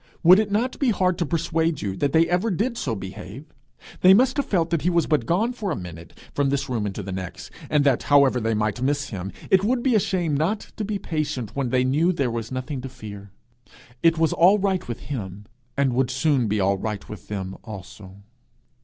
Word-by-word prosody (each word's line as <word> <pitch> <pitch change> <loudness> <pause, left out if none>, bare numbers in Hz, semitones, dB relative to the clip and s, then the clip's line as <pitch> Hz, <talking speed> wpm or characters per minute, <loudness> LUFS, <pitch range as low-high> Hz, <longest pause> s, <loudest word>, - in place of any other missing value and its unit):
Would 180 +4 +8
it 215 -1 0
not 235 +5 0
be 275 - +2
hard 185 -4 +1
to 170 - 0
persuade 165 -2 0
you 95 -2 -2
that 145 - 0
they 165 +1 +4
ever 180 +6 +1
did 220 +6 -1
so 130 - -2
behave? 95 +6 -8 0.5
They 185 +1 +7
must 255 +4 +3
have 285 - 0
felt 170 -4 +1
that 165 -3 +1
he 180 - +1
was 170 -2 +2
but 145 -7 0
'gone 220 +8 +1
for 215 -5 -4
a 160 - -1
minute... 85 -2 -9 0.2
from 140 -1 +1
this 140 0 -1
room 115 -5 -1
into 100 +1 -5
the 95 - -6
next;' 95 -1 -6 0.2
and 150 -1 +3
that, 135 -4 +3
however 140 -3 +4
they 115 -1 0
might 105 +3 -1
miss 140 +1 0
him, 95 -3 -5 0.2
it 190 0 +5
would 240 +3 +1
be 260 - +2
a 215 - +5
shame 185 -6 0
not 175 +9 -1
to 215 - -2
be 210 0 -2
patient 150 - -3
when 135 -3 -1
they 125 +1 +2
knew 150 +7 +2
there 140 -8 -1
was 115 0 -4
nothing 130 +1 -4
to 135 - -6
fear. 100 -4 -10 0.7
It 165 -1 +4
was 160 -1 +2
all 185 +5 +5
right 190 -2 -1
with 120 - -5
him, 105 -7 -6 0.3
and 135 -3 +2
would 125 0 +1
soon 135 -5 +1
be 105 0 0
all 100 0 +1
right 105 -1 -4
with 105 -5 -10
them 95 -2 -5
also! 100 -2 -10
140 Hz, 225 wpm, -24 LUFS, 110-180 Hz, 0.7 s, Would